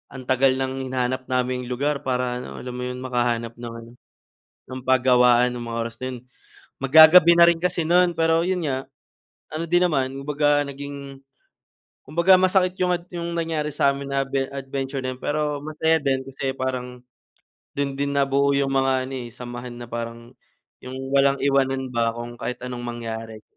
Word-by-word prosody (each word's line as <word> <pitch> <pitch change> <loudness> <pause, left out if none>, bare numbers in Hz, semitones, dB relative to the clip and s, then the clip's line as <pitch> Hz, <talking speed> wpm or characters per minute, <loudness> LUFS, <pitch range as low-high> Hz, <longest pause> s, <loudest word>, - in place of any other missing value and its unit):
ang 130 - -7
tagal 130 +1 +4
ng 130 0 -3
hinanap 130 0 -2
naming 125 -1 -1
lugar 140 +3 -1
para 125 -1 -1
ano, 125 - -8
alam 125 - -6
mo 125 - -4
'yun 125 0 -5
makahanap 120 -2 -1
ng 120 -1 -7
ano, 115 - -14 0.8
ng 130 0 -6
pagawaan 125 -1 +4
ng 120 - -6
mga 115 0 -4
oras 115 0 -7
na - - -3
'yun. 125 - -8 0.6
Mag-gagabi 160 +5 +8
na 170 - +9
rin 170 - +2
kasi 180 -1 0
nun, 175 +1 +4
pero 165 0 +3
'yun 185 -1 -1
nga, 135 -2 -2 0.7
ano 160 +2 -2
din 175 +2 +3
naman 135 -5 -1
kumbaga 145 0 +2
naging, 140 0 -8 0.9
kumbaga 170 +6 +4
masakit 185 -1 +2
'yung 180 0 +2
ad 175 0 -8
'yung 170 0 -4
nangyari 160 -2 -1
sa'min 140 -1 +1
na 135 - +2
adve 135 0 -1
adventure 135 0 -4
na 130 0 -2
'yun 125 - -21
pero 150 0 -1
masaya 160 +1 +1
din, 135 -2 0
kasi 135 0 -3
parang 125 -1 -4 0.8
dun 140 -1 -2
din 140 0 -1
nabuo 140 0 +2
'yung 140 -1 +1
mga 135 0 +2 0.2
ano, 135 - -6
eh, - - -14
samahan 120 0 -8
na 120 - -8
parang 115 +1 -6 0.5
'yung 130 0 -7 0.2
walang 140 0 +4
iwanan 135 -1 +1
ba 115 -1 +1
kung 120 0 -7
kahit 125 - -5
anong 125 -1 -6
mangyari. 115 -2 -6
135 Hz, 175 wpm, -23 LUFS, 125-145 Hz, 0.9 s, na